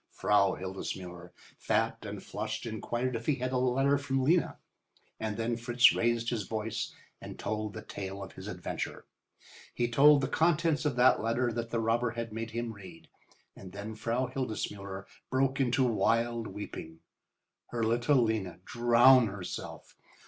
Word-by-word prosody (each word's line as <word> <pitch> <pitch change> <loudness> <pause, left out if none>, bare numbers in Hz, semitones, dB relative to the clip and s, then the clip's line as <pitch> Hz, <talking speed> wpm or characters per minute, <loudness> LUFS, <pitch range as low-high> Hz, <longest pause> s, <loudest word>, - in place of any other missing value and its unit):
Frau 100 -2 +2
Hildesmuller, 90 -2 -6 0.3
fat - - 0
and - - -6
flushed, 110 +2 -4
inquired 120 +3 -2
if 115 0 -5
he 150 - +3
had 130 -1 -3
a 130 - +1
letter 135 +3 +2
from 135 -2 -1
Lena, 165 +6 +2 0.6
and 110 -1 -3
then 115 +1 0
Fritz 120 +1 +5
raised 115 0 +1
his 115 -3 -1
voice 110 0 -3 0.3
and - - -8
told 110 -1 -3
the - - -7
tale 95 0 -6
of 95 - -9
his - - -9
adventure. - - -5 0.7
He 120 - +1
told 140 +4 +6
the 135 - 0
contents 165 -1 +2
of 145 -4 +1
that 125 +1 +5
letter 120 +2 0
that 115 0 -3
the 115 - -1
robber 115 +2 +1
had 115 -2 -4
made 115 +1 -4
him 115 0 -4
read, 95 -5 -13 0.5
and 95 -1 -11
then 100 +2 -6
Frau 115 +4 -1
Hildesmuller 105 -6 -4 0.2
broke 135 +1 +1
into 130 0 +2
wild 115 -1 +1
weeping. 80 -5 -8 0.7
Her 115 -1 -2
little 120 +4 +3
Lena 105 -6 -1
drown 120 +1 +6
herself! 95 -3 -7
115 Hz, 155 wpm, -30 LUFS, 105-125 Hz, 0.7 s, told